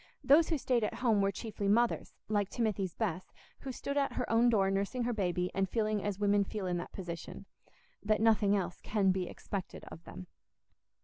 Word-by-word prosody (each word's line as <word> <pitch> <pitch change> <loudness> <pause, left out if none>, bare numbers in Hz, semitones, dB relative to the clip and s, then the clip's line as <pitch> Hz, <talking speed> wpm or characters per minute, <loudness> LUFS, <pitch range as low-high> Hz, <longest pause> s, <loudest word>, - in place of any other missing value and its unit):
Those 290 +5 +5
who 320 - +1
stayed 250 -4 +1
at 210 - -1
home 225 -5 +2
were 195 0 +2
chiefly 205 0 -4
mothers, 235 +4 +1
like 205 -2 0
Timothy's 210 -6 -1
Bess, 180 +3 -3 0.3
who 270 - -6
stood 280 +3 -4
at 280 -1 +1
her 250 - -2
own 230 +2 +5
door 195 -4 +3
nursing 200 +6 -1
her 240 +1 0
baby 180 -3 -1
and 195 0 0
feeling 215 -2 0
as 205 -2 -2
women 205 0 +3
feel 200 0 -5
in 180 -1 -1
that 175 - -6
position—that 190 +4 -6
nothing 215 -2 +4
else 180 -3 -3
can 200 -3 +2
be 185 -1 -1
expected 195 -3 -6
of 165 - -10
them. 90 - -9
205 Hz, 190 wpm, -32 LUFS, 190-230 Hz, 0.3 s, Those